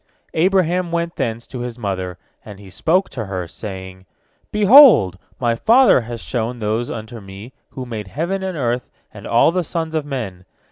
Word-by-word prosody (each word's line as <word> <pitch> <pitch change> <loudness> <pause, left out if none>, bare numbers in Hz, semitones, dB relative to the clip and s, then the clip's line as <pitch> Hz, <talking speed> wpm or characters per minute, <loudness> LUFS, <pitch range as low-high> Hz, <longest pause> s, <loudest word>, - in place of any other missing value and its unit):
Abraham 180 0 +1
went 170 0 -2
thence 115 0 -3
to 125 - -8
his 120 -1 -5
mother, 95 -5 -4 0.3
and 105 -2 -11
he 100 -2 -13
spoke 175 - +1
to 115 -4 -5
her, 95 -3 -4
saying: 95 -1 -9 0.4
"Behold, 210 - +7 0.2
my 120 -2 +1
father 230 - +5
has 120 0 -7
shown 120 0 -3
those 110 +2 -2
unto 115 +1 -7
me 100 +6 -11 0.2
who 130 - -7
made 110 -4 -6
heaven 170 - -3
and 190 -3 -4
earth 125 -2 -2 0.2
and 105 -1 -10
all 120 +7 +4
the 180 +1 -1
sons 165 0 -4
of 155 -2 -1
men. 110 -11 -6
120 Hz, 175 wpm, -19 LUFS, 100-170 Hz, 0.4 s, Behold